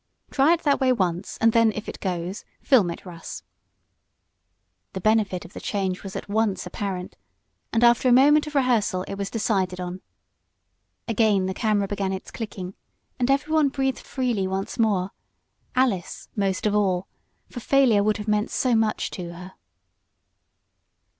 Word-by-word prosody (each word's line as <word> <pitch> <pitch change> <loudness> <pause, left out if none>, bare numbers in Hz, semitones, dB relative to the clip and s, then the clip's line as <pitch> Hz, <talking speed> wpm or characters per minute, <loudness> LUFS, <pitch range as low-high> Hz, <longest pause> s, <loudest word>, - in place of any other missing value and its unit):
Try 285 +4 +4
it 340 - -2
that 285 -2 +3
way 260 -1 +4
once, 185 -5 -1
and 225 0 +4
then, 230 -1 +5
if 215 - -6
it - - -7
goes, 180 0 -3 0.2
film 225 -10 +4
it, 170 - -7
Russ." 170 -2 -8 1.5
The 190 - -4
benefit 210 -2 +1
of 190 - -13
the - - -7
change 190 -3 -2
was 195 -1 -8
at - - -5
once 205 -3 0
apparent, 190 -3 -5 0.5
and 230 +1 +2
after 240 +1 +5
a - - +4
moment 295 +5 +5
of 300 - -8
rehearsal 230 -8 +2
it - - -7
was 195 0 -4
decided 190 -5 -1
on. 180 +1 -5 1.1
Again 215 -4 +2
the 190 - -2
camera 205 -1 +1
began 195 -1 -2
its 190 - -7
clicking 195 -5 -6 0.5
and 245 +1 +1
everyone 295 +2 +2
breathed 270 -1 -1
freely 240 -8 -1
once 195 +5 -4
more, 200 -4 +1 0.6
Alice 230 -9 0
most 195 -2 -1
of 210 - +2
all, 195 -3 +1 0.4
for 245 - -8
failure 245 -4 +4
would 215 0 +1
have 210 0 -7
meant 210 0 +1
so 255 -2 +1
much 220 -1 +1
to 175 -3 -6
her. 180 +2 -10
210 Hz, 160 wpm, -24 LUFS, 190-240 Hz, 1.5 s, then